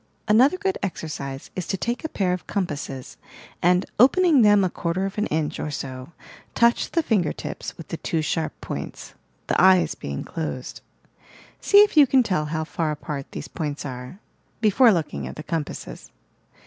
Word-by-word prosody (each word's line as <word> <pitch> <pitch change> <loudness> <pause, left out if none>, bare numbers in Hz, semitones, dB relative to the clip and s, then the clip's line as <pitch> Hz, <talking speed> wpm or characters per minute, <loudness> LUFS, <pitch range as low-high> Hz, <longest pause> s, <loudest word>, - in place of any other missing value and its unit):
Another 255 - +5
good 385 0 -1
exercise 145 -7 -5
is 180 -3 -4
to 195 - -1
take 235 - -3
a 315 - -3
pair 185 -8 0
of 180 - -5
com 200 -2 0
passes 140 -4 -7 0.4
and, 180 +2 +3
opening 300 +3 +5
them 205 -2 +6
a 185 - +1
quarter 175 +3 -2
of 195 +2 -4
an 215 - 0
inch 155 -1 -2
or - - -3
so, 130 -1 -6 0.4
touch 235 0 +3
the 335 - 0
finger 195 - +1
tips - - -7
with 165 - -11
the 165 - -4
two 160 -1 -2
sharp 160 +1 -2
points, - - -7 0.3
the - - +1
eyes 185 -1 +5
being 70 0 -5
closed. 150 -6 -5 0.8
See 405 0 +7
if 415 - -1
you 295 -3 +7
can 260 0 +4
tell 180 -9 0
how 160 +1 -2
far 160 0 -2
apart 150 -2 -5
these - - -6
points 150 -2 -4
are, 125 +5 -7 0.2
— - - -40
before 235 +3 +6
looking 150 - -2
at 65 - -8
the - - -7
compasses. 160 -3 -5
175 Hz, 185 wpm, -24 LUFS, 150-220 Hz, 0.8 s, See